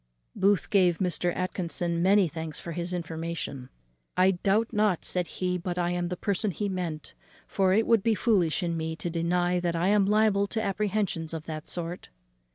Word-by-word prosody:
Booth 200 -1 +2
gave 180 -4 +4
Mr. 180 -1 +1
Atkinson 175 -2 -1
many 195 +1 +5
thanks 160 -1 -6
for 170 - -7
his 175 +2 -4
information. 165 -6 -4 0.5
"I 185 +1 +5
doubt 200 +5 0
not," 210 -5 +1
said 180 -2 -1
he, 180 -1 -2
"but 175 0 -4
I 175 0 0
am 175 0 -1
the 180 0 -4
person 200 +2 0 0.2
meant; 170 -4 -4 0.3
for 190 -2 +2
it 220 +4 +3
would 230 -3 +4
be 225 +2 +2
foolish 195 -7 +2
in 170 -1 -1
me 160 0 -3
to 170 +1 -4
deny 175 +2 +1
that 175 -1 -1
I 175 +3 +1
am 205 -1 +4
liable 210 -1 +3
to 220 - -3
apprehensions 195 -5 -1
of 160 - -5
that 155 -1 -6
sort." 175 0 -4
180 Hz, 180 wpm, -27 LUFS, 170-200 Hz, 0.5 s, many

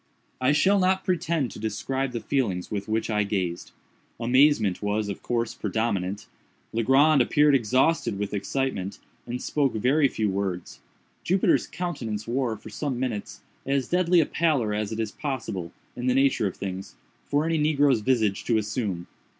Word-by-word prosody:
I 130 +2 +4
shall 195 +7 +4
not 190 +1 +2
pretend 165 - 0
to - - -9
describe 130 +5 -2
the 120 - -3
feelings 110 -9 -1
with 100 -1 -3
which 110 +1 -1
I 105 -1 +2
gazed. 95 -4 -2 0.5
Amazement 125 -4 +3
was, 105 0 -1
of 100 - -5
course, 120 -1 -1
predominant. 105 -2 -2 0.5
Legrand 135 +6 +4
appeared 150 +4 +4
exhausted 130 0 +2
with 105 0 -3
excitement, 100 -2 -2 0.3
and 125 +1 -3
spoke 140 -2 0
very 135 +7 +3
few 110 -4 -1
words. 95 -3 -3 0.4
Jupiter's 185 +2 +2
countenance 120 -13 -4
wore, 120 -2 -1
for - - -12
some 140 -5 -3
minutes, 115 -6 -4 0.2
as 135 -2 -1
deadly 180 0 +3
a 160 - +4
pallor 145 -12 +1
as 105 0 -2
it 110 - -4
is 110 -2 -2
possible, 115 - -4 0.2
in 125 +1 -3
nature 130 -4 +3
of 95 - -6
things, 95 -1 -6 0.3
for 145 +2 +1
any 165 -1 +1
negro's 145 -4 +3
visage 110 -5 +1
to 115 - +2
assume. 105 -5 -2
120 Hz, 160 wpm, -26 LUFS, 105-140 Hz, 0.5 s, I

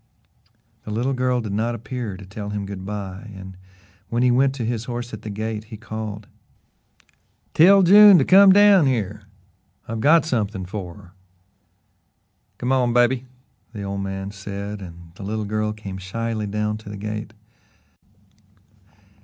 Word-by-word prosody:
The - - -9
little 120 +6 -1
girl 125 -1 0
did 110 -3 -5
not 115 +3 -1
appear 115 -3 -6
to 100 - -11
tell 100 +2 -7
him 105 -1 -4
goodby, 100 +1 -7
and 95 0 -10 0.5
when 120 +1 0
he 125 - +4
went 135 +2 +2
to 120 -4 -3
his 115 -1 -3
horse 120 -1 -5
at 110 - -7
the 110 - -7
gate, 110 +1 -4
he 110 0 -10
called: 110 -2 -6 1.3
"Tell 195 +4 +6
June 205 +2 +8
to - - +2
come 195 +1 +7
down 200 -5 +6
here. 105 -5 -2 0.6
I've 115 0 -4
got 160 +5 +5
something 105 - -2
for 90 -2 -7
her." 95 -4 -16 1.5
"Go 125 - -2
on, 125 -2 +2
baby," 120 +1 +2 0.5
the 105 -3 -6
old 100 0 -4
man 95 0 -5
said, 100 +1 -7
and 85 -2 -11
the 85 - -13
little 105 +2 -3
girl 110 +1 -1
came 100 -3 -8
shyly 110 +3 -4
down 105 +1 -2
to 110 - -11
the 105 - -7
gate. 105 +1 -6
110 Hz, 155 wpm, -22 LUFS, 100-120 Hz, 1.5 s, June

